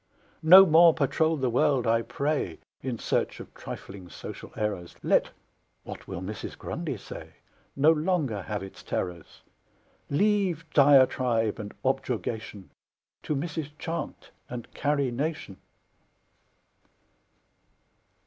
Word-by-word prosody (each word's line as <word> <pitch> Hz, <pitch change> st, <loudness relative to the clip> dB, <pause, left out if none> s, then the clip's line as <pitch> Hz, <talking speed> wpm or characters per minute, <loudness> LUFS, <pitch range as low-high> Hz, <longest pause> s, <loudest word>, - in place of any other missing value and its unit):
No 185 Hz, +4 st, +10 dB
more 165 Hz, -1 st, +6 dB
patrol 160 Hz, +2 st, +1 dB
the 130 Hz, -2 st, 0 dB
world, 125 Hz, +1 st, +2 dB
I 115 Hz, 0 st, +3 dB
pray, 140 Hz, +6 st, -2 dB, 0.2 s
In 130 Hz, -3 st, -3 dB
search -, -, -1 dB
of -, -, -11 dB
trifling 95 Hz, -2 st, -9 dB
social -, -, -9 dB
errors, 100 Hz, -5 st, -3 dB
Let -, -, +3 dB, 0.5 s
"What -, -, -9 dB
will 95 Hz, -2 st, -5 dB
Mrs. 105 Hz, +3 st, -6 dB
Grundy -, -, -4 dB
say?" -, -, -10 dB, 0.4 s
No 145 Hz, +3 st, +5 dB
longer 155 Hz, -, 0 dB
have 105 Hz, +1 st, -4 dB
its 95 Hz, -, -10 dB
terrors; 90 Hz, -3 st, -5 dB, 0.7 s
Leave 185 Hz, 0 st, +1 dB
diatribe 130 Hz, -6 st, +4 dB
and 105 Hz, -1 st, -7 dB
objurgation 110 Hz, -3 st, -3 dB, 0.5 s
To 150 Hz, -, -2 dB
Mrs. 150 Hz, 0 st, -4 dB
Chant 165 Hz, +2 st, -5 dB, 0.2 s
and 120 Hz, -2 st, -8 dB
Carrie 140 Hz, -3 st, 0 dB
Nation! 135 Hz, -, -4 dB
135 Hz, 110 wpm, -27 LUFS, 110-160 Hz, 0.7 s, No